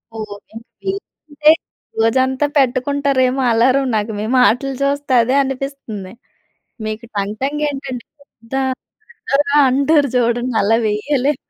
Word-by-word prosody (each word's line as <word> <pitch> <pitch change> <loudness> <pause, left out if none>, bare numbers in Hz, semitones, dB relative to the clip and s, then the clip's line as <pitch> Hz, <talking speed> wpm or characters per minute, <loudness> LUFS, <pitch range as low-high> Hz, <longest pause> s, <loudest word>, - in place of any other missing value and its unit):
ఓహ్! 220 - -4
Okay. 205 +2 -14 0.7
అంటే 300 +1 +4 0.5
రోజంతా 260 +4 +2
పెట్టుకుంటారేమో 270 0 +1
alarm 255 +4 +3
నాకు 215 +1 -1
మీ 210 - -2
మాటలు 250 +2 +3
చూస్తే 285 -1 0
అదే 255 +3 0
అనిపిస్తుంది. 265 -8 -6 0.7
మీకు 215 +2 -5
టంగ్, 200 +1 -2
టంగ్ 295 +2 -1
ఏంటంటే 270 -3 -6 0.2
ఆహ్, 280 - -22
పెద్ద 230 +3 -14 0.6
బిగ్గరగా 290 -9 +1
అంటారు 280 +2 +3
చూడండి 240 0 +1
అలా 225 +3 +3
వెయ్యలేము. 265 +7 0
260 Hz, 120 wpm, -18 LUFS, 230-280 Hz, 0.7 s, అంటే